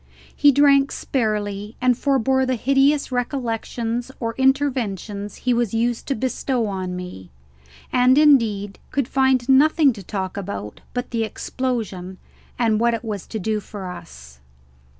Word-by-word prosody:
He 290 - +6
drank 280 0 +4
sparely 210 -3 -2
and 250 -1 +3
forbore 265 0 +1
the 255 - +1
hideous 275 +4 +2
recollections 240 -1 -2
or 230 -2 -2
inventions 240 -7 -1
he 250 - 0
was 235 -2 0
used 235 +1 -1
to 275 - 0
bestow 255 0 -1
on 185 -3 -3
me, 180 - -8 0.6
and 255 +1 +5
indeed 225 -10 +3
could 275 -3 -1
find 265 -2 +2
nothing 285 +1 +5
to 205 - -10
talk 190 0 -4
about 105 - -6
but 245 0 -3
the 230 -1 0
explosion 215 -6 -4 0.4
and 225 -3 +2
what 235 0 +2
it 230 - -7
was 205 -4 -5
to 220 - -5
do 215 +1 -1
for 195 -2 -7
us. 65 - -12
235 Hz, 145 wpm, -22 LUFS, 205-265 Hz, 0.6 s, He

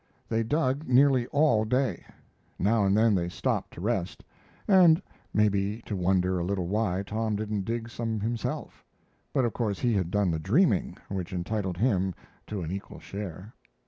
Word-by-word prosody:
They 115 0 +1
dug 140 +4 0
nearly 130 -1 +4
all 140 -7 +3
day. 125 -3 0 0.5
Now 105 +1 +2
and 100 +1 +3
then 110 0 +4
they 85 -2 0
stopped - - -2
to - - -8
rest, 100 -4 -2 0.4
and 180 -5 +6 0.3
maybe 105 +1 +1
to 105 - -3
wonder 90 0 +1
a - - -1
little 95 0 -1
why 100 -1 0
Tom 110 +1 -1
didn't 105 -2 -2
dig 115 +1 -3
some 115 -2 -3
himself; 115 +1 -4 0.5
but, 130 - +2
of 115 - -1
course, 105 -5 -1
he 120 +3 +1
had 95 -5 0
done 100 -1 +1
the 80 - -1
dreaming, 110 - +2
which 95 -1 -4
entitled 95 0 -2
him 95 -5 +1 0.3
to 100 -4 -4
an 80 - -4
equal 100 +2 -6
share. 100 +1 -7
105 Hz, 170 wpm, -28 LUFS, 95-115 Hz, 0.5 s, and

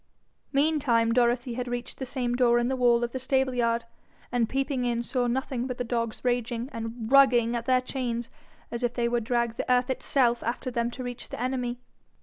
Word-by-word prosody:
Meantime 275 -6 +2
Dorothy 240 +1 +2
had 250 +1 -4
reached 245 0 -5
the 265 - -4
same 245 -2 -2
door 245 -1 +4
in 240 +1 +1
the 265 - 0
wall 240 -2 +3
of 235 - -2
the 260 - -4
stableyard, 250 -3 +1 0.5
and 235 -2 +1
peeping 270 -1 -1
in 240 -1 0
saw 245 0 -1
nothing 255 0 -2
but 250 -1 -4
the 245 - -1
dogs 230 -1 -3
raging 245 0 -1
and 225 +1 -5
RUGGING 245 -4 +5
at 235 0 -4
their 255 -1 +4
chains 240 -3 -3 0.4
as 235 - -4
if 245 -1 -1
they 235 -1 +1
would 235 -1 0
drag 235 0 0
the - - -1
earth 250 +1 +3
itself 245 -2 +2
after 250 +2 -3
them 235 0 0
to 255 +1 -7
reach 245 -1 -6
the - - -6
enemy. 250 -1 -2
245 Hz, 200 wpm, -27 LUFS, 235-255 Hz, 0.5 s, RUGGING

